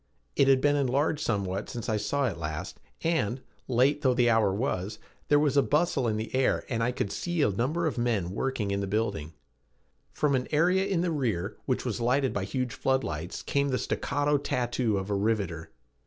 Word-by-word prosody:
It 140 - +4
had 135 -1 +5
been 145 0 +3
enlarged 145 +3 +1
somewhat 100 -5 -1
since 120 -3 -5
I 110 - +1
saw 135 +7 0
it 100 -9 -2
last 75 -1 -5 0.2
and, 150 -8 0 0.3
late 130 +4 +3
though 130 -3 +3
the 120 -1 +4
hour 110 -3 +3
was, 100 -2 -2 0.3
there 145 - +5
was 145 -2 +2
a 140 - +6
bustle 150 -4 +1
in 110 -1 0
the 110 - -5
air 130 0 +1
and 115 -2 -1
I 120 +2 +1
could 105 -5 -3
see 175 -3 -1
a 105 - +3
number 135 - 0
of 145 -6 -1
men 110 -7 0
working 110 -2 -2
in 100 - 0
the 100 - -2
building. 100 -7 -2 0.8
From 150 -2 +1
an 130 -1 0
area 180 +5 +3
in 190 -4 +1
the 175 -1 0
rear, 115 - -1
which 130 -1 0
was 120 -1 -2
lighted 130 +3 +2
by 100 -1 -2
huge 125 +2 -2
flood 130 0 +1
lights, 80 +3 -5
came 140 0 0
the 130 - +1
staccato 145 +2 0
tattoo 120 -5 0
of 95 +1 -3
a - - +1
riveter. 100 -6 -1
125 Hz, 205 wpm, -28 LUFS, 105-140 Hz, 0.8 s, a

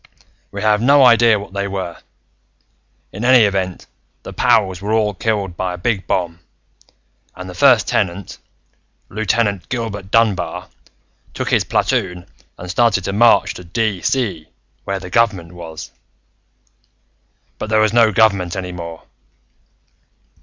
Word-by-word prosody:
We 100 +1 -6
have 105 0 +2
no 140 +2 +5
idea 115 -2 +5
what 100 -1 -9
they 100 0 -2
were. 95 -3 -5 1.1
In 105 - -7
any 125 -1 +6
event, 95 -3 -2 0.4
the - - -9
pows 105 -7 +1
were 105 +2 -2
all 105 -2 +1
killed 100 -3 -2
by 90 0 -3
a - - -10
big 95 +2 -2
bomb, 85 -2 -2 1.0
and 90 +1 -8
the 90 - -8
First 120 +1 +4
Tenant, 95 0 -2 0.7
Lieutenant 105 -1 -1
Gilbert 110 -6 -4
Dunbar, 105 -4 0 0.7
took - - -3
his - - +3
platoon 90 -1 -1 0.3
and 90 - -9
started 105 -1 +2
to 100 - -3
march 115 +3 +4
to 90 - -10
DeeCee, 105 0 -2 0.4
where 100 0 -2
the 90 -1 -10
government 100 -8 +1
was. 80 -3 -9 1.7
"But 110 - -5
there 110 0 +3
was 110 0 +2
no 115 -2 +4
government 100 -5 +2
any 90 -1 -5
more. 85 -2 -8
100 Hz, 135 wpm, -18 LUFS, 90-110 Hz, 1.7 s, any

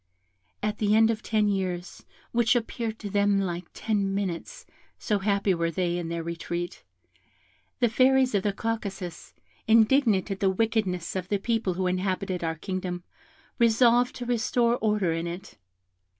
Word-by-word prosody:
At 210 0 -1
the 210 0 +3
end 225 +1 +5
of 220 -1 -4
ten 215 -1 +1
years 185 -3 -3 0.2
(which 235 0 +3
appeared 230 -1 -2
to 210 - -6
them 200 0 +3
like 175 -2 -3
ten 200 -3 -1
minutes, 200 - -4 0.3
so 210 -3 0
happy 200 -1 +1
were 170 -1 0
they 175 +1 -1
in 165 -1 -4
their 170 0 -3
retreat), 170 +1 -5 1.0
the 245 - +4
fairies 260 +2 +3
of 200 - +2
the 205 - 0
Caucasus, 200 -4 -5 0.3
indignant 220 -3 +4
at 195 - -3
the 195 - +3
wickedness 195 -4 -1
of 185 -1 -3
the 205 - +2
people 220 -3 -1
who 185 +1 -1
inhabited 185 0 -1
our 160 0 -1
kingdom, 180 0 -4 0.6
resolved 235 +1 +4
to 245 - -5
restore 235 0 +2
order 210 -7 +1
in 165 +1 -2
it. 175 +3 -8
200 Hz, 155 wpm, -27 LUFS, 180-225 Hz, 1.0 s, end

